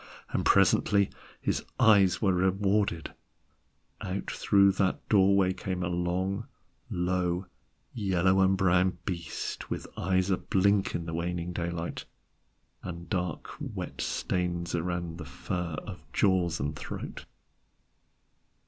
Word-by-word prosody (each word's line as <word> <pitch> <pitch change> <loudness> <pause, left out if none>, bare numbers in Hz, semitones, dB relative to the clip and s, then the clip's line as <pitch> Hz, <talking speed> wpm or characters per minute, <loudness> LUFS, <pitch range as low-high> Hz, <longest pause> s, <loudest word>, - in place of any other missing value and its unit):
And - - 0
presently 100 -1 +4 0.3
his - - -1 0.2
eyes 105 -6 +5
were 95 -2 +4
rewarded: 95 -1 +1 0.9
out 95 +2 -3
through 100 -1 +4
that 95 -1 -1
doorway 100 -2 +4
came 95 -1 -3
a 90 - -1
long, 90 +5 -1 0.4
low, 90 0 0 0.5
yellow 95 -3 +2
and 95 0 +4
brown 90 0 +3
beast, 85 -5 -4
with - - -3
eyes 95 +1 +1
a 95 - +3
blink 100 +1 +2
at 85 - -3
the 80 - -5
waning 85 +1 -2
daylight, 85 0 -3 0.8
and 85 -1 -7
dark 90 -4 -2
wet - - -5
stains 85 -1 -1
around 85 -1 -2
the 80 - -6
fur 85 +4 -4
of - - -8
jaws 90 -4 +2
and 75 +3 -2
throat. - - -7
90 Hz, 120 wpm, -29 LUFS, 85-95 Hz, 0.9 s, eyes